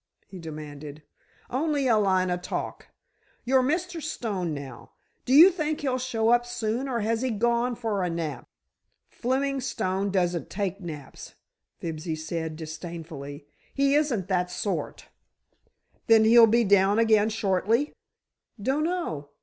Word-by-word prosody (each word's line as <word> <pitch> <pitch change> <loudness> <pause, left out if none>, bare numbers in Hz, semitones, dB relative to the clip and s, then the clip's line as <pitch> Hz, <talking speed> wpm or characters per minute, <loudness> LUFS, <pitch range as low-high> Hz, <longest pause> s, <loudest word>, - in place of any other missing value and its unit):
he 190 - -11
demanded. 150 -2 -8 0.5
"Only 285 +1 0
a 235 - +4
line 190 -3 +2
o' 180 - 0
talk. 180 - -5 0.6
Your 260 +1 +4
Mr. 330 +5 -1
Stone, 205 - -3
now, 140 -4 -8 0.3
do - - -3
you 325 +8 +9
think 310 -2 -2
he'll 260 -3 0
show 230 -3 0
up 240 0 +4
soon, 240 +2 -3
or 235 -3 -1
has 225 +2 0
he 260 - 0
gone 235 +2 +1
for 220 -4 -2
a 180 - 0
nap?" 160 -6 -4 0.6
"Fleming 270 +2 -1
Stone 200 -6 -1
doesn't 175 -3 0
take 200 0 -3
naps," 150 -6 -9 0.4
Fibsy 160 0 -4
said, 160 0 -4
disdainfully; 155 -3 -8 0.3
"he 275 0 +3
isn't 275 - +1
that 180 -2 0
sort." 180 +3 -3 1.0
"Then 225 -1 +6
he'll 230 +1 +8
be 235 +2 +3
down 200 0 +4
again 220 -2 +4
shortly?" 220 +6 0 0.7
"Dunno. 270 - -1
215 Hz, 135 wpm, -26 LUFS, 170-255 Hz, 1.0 s, you